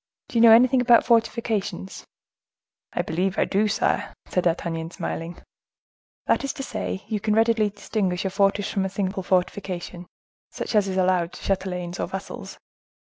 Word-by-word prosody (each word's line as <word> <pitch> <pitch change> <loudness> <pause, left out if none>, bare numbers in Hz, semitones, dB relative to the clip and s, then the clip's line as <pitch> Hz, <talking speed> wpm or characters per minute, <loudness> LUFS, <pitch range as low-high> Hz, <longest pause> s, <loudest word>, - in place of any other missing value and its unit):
Do - - -12
you - - +5
know 230 -1 +9
anything 250 +3 +6
about 240 -1 +5
fortifications?" 225 -5 -1 0.8
"I - - -1
believe 180 +4 -1
I - - +3
do, 210 +2 +1
sire," 210 - 0
said 180 - -1
D'Artagnan, 165 -1 -1
smiling. 170 0 -5 0.9
"That - - +2
is 275 - -2
to 270 - -6
say 215 -4 -4
you 215 - -2
can 215 +1 0
readily 225 -1 +3
distinguish 195 -3 -2
a 190 - -1
fortress 200 +1 +1
from 195 - 0
a - - -2
simple 190 0 -2
fortification, 180 -1 -2 0.4
such - - -5
as 210 -2 +3
is 190 -1 -2
allowed 180 -2 +1
to - - -11
chatelains 180 -2 -2
or - - -1
vassals?" 195 +1 -7
195 Hz, 165 wpm, -24 LUFS, 180-215 Hz, 0.9 s, know